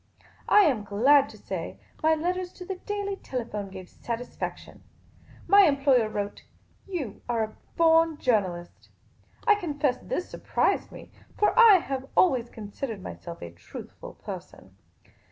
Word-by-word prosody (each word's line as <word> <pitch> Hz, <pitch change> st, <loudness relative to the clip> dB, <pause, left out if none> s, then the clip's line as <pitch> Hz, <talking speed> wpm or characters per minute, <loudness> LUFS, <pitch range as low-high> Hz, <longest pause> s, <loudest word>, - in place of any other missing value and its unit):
I 420 Hz, -, +7 dB
am 260 Hz, -, +2 dB
glad 265 Hz, +8 st, +4 dB
to -, -, -13 dB
say, -, -, -6 dB, 0.2 s
my 315 Hz, 0 st, +4 dB
letters 360 Hz, +3 st, -2 dB
to 360 Hz, -, -10 dB
the 385 Hz, 0 st, -5 dB
Daily 400 Hz, 0 st, -4 dB
Telephone 220 Hz, -, -5 dB
gave 190 Hz, -1 st, -9 dB
satisfaction. 235 Hz, +5 st, -6 dB, 0.6 s
My 400 Hz, 0 st, +7 dB
employer 275 Hz, -6 st, +3 dB
wrote, 205 Hz, -1 st, -4 dB, 0.3 s
" -, -, -34 dB
You 300 Hz, -, -5 dB
are 230 Hz, -2 st, +1 dB
a 215 Hz, 0 st, -6 dB, 0.2 s
born 325 Hz, -1 st, +4 dB
journalist." 185 Hz, -10 st, -1 dB, 0.6 s
I 435 Hz, -, +7 dB
confess 295 Hz, -9 st, -1 dB
this 360 Hz, -, -3 dB
surprised -, -, -1 dB
me; -, -, -12 dB, 0.3 s
for 420 Hz, -, +3 dB
I 465 Hz, -4 st, +9 dB
have 270 Hz, -6 st, -2 dB
always 255 Hz, -10 st, +3 dB
considered 215 Hz, 0 st, -6 dB
myself 170 Hz, -1 st, -8 dB
a 85 Hz, -, -7 dB
truthful 85 Hz, +1 st, -11 dB
person. -, -, -10 dB
275 Hz, 140 wpm, -27 LUFS, 215-355 Hz, 0.6 s, I